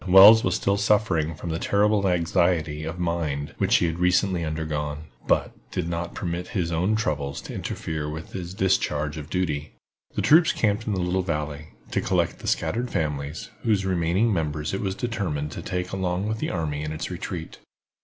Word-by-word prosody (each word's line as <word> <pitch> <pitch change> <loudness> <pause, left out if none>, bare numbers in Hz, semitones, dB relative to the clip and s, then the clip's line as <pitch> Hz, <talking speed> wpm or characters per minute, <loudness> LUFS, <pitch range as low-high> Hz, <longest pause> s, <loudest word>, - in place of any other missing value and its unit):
Wells 100 +5 +9
was 95 - +1
still 100 +1 +1
suffering 95 -6 +2
from 85 +2 -5
the 80 - -2
terrible 100 0 +2
anxiety 85 -3 +1
of 80 +3 -4
mind 85 -5 -2
which - - +3
he - - +4
had 85 0 -2
recently 90 0 +2
undergone, 75 -1 -3 0.2
but - - +2 0.2
did 90 -2 -2
not 85 0 -3
permit 90 0 -3
his 85 -2 0
own 90 +6 +1
troubles 75 -10 -1
to - - -8
interfere 80 -2 -4
with 80 +2 -7
his 90 0 -6
discharge 75 -6 +1
of 75 -1 -7
duty. 75 -5 -2 0.4
The - - 0
troops 160 +2 +6
camped 110 +1 0
in 105 - +1
the 95 - -1
little 90 +1 +1
valley, 75 -3 -4 0.2
to - - +1
collect - - 0
the - - -8
scattered 120 +2 0
families, 75 -4 -3
whose 105 -4 +1
remaining 95 +5 +2
members 75 -2 -2
it 95 - -1
was 95 -2 -2
determined 95 -10 -2
to - - -6
take 90 -1 -3
along 95 +1 -1
with 110 0 -2
the - - -1
army 75 -4 -2
in 75 0 -3
its 80 - -4
retreat. - - -6
85 Hz, 185 wpm, -25 LUFS, 75-95 Hz, 0.4 s, Wells